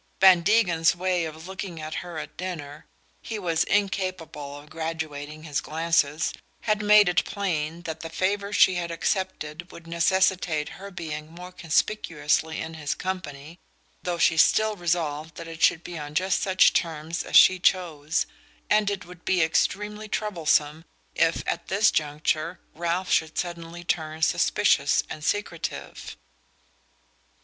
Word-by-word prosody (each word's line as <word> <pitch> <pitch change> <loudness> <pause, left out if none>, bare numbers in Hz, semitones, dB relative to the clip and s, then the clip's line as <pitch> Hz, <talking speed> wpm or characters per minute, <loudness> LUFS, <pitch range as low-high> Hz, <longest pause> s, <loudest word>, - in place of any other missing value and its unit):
Van 190 -2 +7
Degen's 175 -5 +3
way 180 -1 0
of 160 +1 -8
looking 190 -3 -6
at 155 0 -6
her 175 -2 -8
at 155 - -7
dinner 155 -5 -6 0.3
he 225 - -5
was 170 -5 +1
incapable 185 -8 -2
of 145 +1 -13
graduating 155 -2 -5
his 150 -3 -2
glances 160 -1 0 0.3
had 215 -1 0
made 210 -1 +6
it 180 +2 +3
plain 170 -4 -3
that 160 -1 -5
the 165 - -6
favour 200 +4 -1
she 190 - +5
had 175 -1 -2
accepted 170 -2 -3
would 170 - -12
necessitate 170 -2 +1
her 200 +1 -9
being 155 -4 -6
more 180 +2 -10
conspicuously 160 -3 0
in 160 0 -5
his 150 -2 -3
company 170 -3 -6 0.4
(though 175 -1 -2
she 165 - +4
was 160 - +6
still 215 0 +3
resolved 160 -4 -2
that 165 - -8
it 165 0 -9
should 165 - +4
be 175 -2 -7
on 145 0 -8
just 185 +2 +1
such 190 -1 +4
terms 160 0 -2
as - - -5
she 185 -1 +8
chose); 165 -4 +1 0.5
and 210 -1 +4
it 200 -1 -4
would 175 0 -14
be 185 -3 +2
extremely 210 +6 0
troublesome 160 -7 0 0.3
if, 165 0 +1
at - - -3
this 200 +3 +3
juncture, 155 +3 -1
Ralph 170 +3 -2
should 160 -1 +1
suddenly 170 -1 -5
turn 160 -2 -2
suspicious - - +3
and 155 - -7
secretive. 205 -2 -3
170 Hz, 150 wpm, -26 LUFS, 155-185 Hz, 0.5 s, she